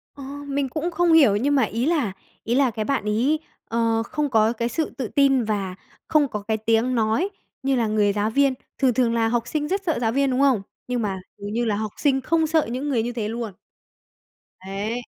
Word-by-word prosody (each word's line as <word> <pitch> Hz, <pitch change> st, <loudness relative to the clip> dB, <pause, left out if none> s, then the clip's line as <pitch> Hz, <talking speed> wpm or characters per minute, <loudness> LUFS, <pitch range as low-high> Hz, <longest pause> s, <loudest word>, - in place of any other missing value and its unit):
Ờ, 280 Hz, -, -9 dB, 0.2 s
mình 280 Hz, -1 st, -1 dB
cũng 315 Hz, +6 st, -2 dB
không 345 Hz, -1 st, +3 dB
hiểu 275 Hz, -11 st, +6 dB
nhưng 280 Hz, +7 st, +1 dB
mà 270 Hz, -, +4 dB
ý 230 Hz, +4 st, -1 dB
là 300 Hz, -, +1 dB, 0.3 s
ý 235 Hz, -, 0 dB
là 265 Hz, -2 st, +3 dB
cái 215 Hz, -1 st, -3 dB
bạn 275 Hz, -5 st, 0 dB
ấy, 240 Hz, +9 st, +1 dB, 0.3 s
ờ, 230 Hz, -1 st, +1 dB
không 295 Hz, +5 st, -2 dB
có 220 Hz, -2 st, +3 dB
cái 235 Hz, 0 st, -2 dB
sự 315 Hz, +4 st, -1 dB
tự 260 Hz, -4 st, -2 dB
tin 270 Hz, 0 st, +3 dB
và 200 Hz, -4 st, -2 dB, 0.3 s
không 300 Hz, -2 st, +3 dB
có 210 Hz, -5 st, -5 dB
cái 220 Hz, +2 st, -1 dB
tiếng 225 Hz, +3 st, +1 dB
nói 225 Hz, -, +1 dB, 0.3 s
như 270 Hz, 0 st, +2 dB
là 230 Hz, -3 st, +1 dB
người 210 Hz, -1 st, +2 dB
giáo 205 Hz, +1 st, 0 dB
viên, 275 Hz, +3 st, +3 dB, 0.2 s
thường 260 Hz, -2 st, +3 dB
thường 235 Hz, -1 st, +2 dB
là 230 Hz, -1 st, +2 dB
học 235 Hz, 0 st, 0 dB
sinh 300 Hz, -1 st, -2 dB
rất 390 Hz, +4 st, -1 dB
sợ 325 Hz, -7 st, 0 dB
giáo 225 Hz, -1 st, +2 dB
viên, 275 Hz, +1 st, +1 dB
đúng 255 Hz, -, 0 dB
không? 265 Hz, -8 st, +4 dB, 0.3 s
Nhưng 250 Hz, -1 st, -1 dB
mà 195 Hz, -3 st, -2 dB, 0.2 s
dường 205 Hz, +1 st, -6 dB
như 240 Hz, +1 st, 0 dB
là 215 Hz, -2 st, +1 dB
học 215 Hz, 0 st, -3 dB
sinh 270 Hz, -2 st, +2 dB
không 320 Hz, +4 st, +1 dB
sợ 315 Hz, 0 st, +2 dB
những 265 Hz, +4 st, -3 dB
người 240 Hz, -5 st, +1 dB
như 240 Hz, -, -2 dB
thế 225 Hz, -3 st, -3 dB
luôn. 230 Hz, 0 st, -4 dB, 1.1 s
Ấy. 200 Hz, +5 st, -4 dB
240 Hz, 230 wpm, -23 LUFS, 220-280 Hz, 1.1 s, hiểu